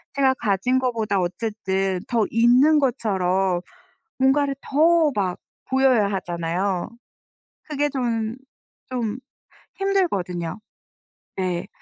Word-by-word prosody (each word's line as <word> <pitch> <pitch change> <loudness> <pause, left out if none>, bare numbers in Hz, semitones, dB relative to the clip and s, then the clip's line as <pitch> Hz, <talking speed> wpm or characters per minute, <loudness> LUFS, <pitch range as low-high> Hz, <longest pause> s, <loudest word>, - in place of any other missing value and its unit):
제가 270 -1 +3
가진 235 +2 +1
것보다 225 -6 0
어쨌든 190 0 -1
더 230 -3 +2
있는 250 +7 +5
것처럼 190 -8 0 0.6
뭔가를 275 +1 +3
더 315 +2 +3
막 185 -3 -1 0.3
보여야 260 -6 +3
하잖아요. 175 0 -2 0.8
그게 295 0 0
좀 230 -3 -2 0.5
좀 240 -2 -2 0.6
힘들거든요. 200 - -1 0.8
네. 180 -2 -2
225 Hz, 195 characters per minute, -23 LUFS, 190-265 Hz, 0.8 s, 있는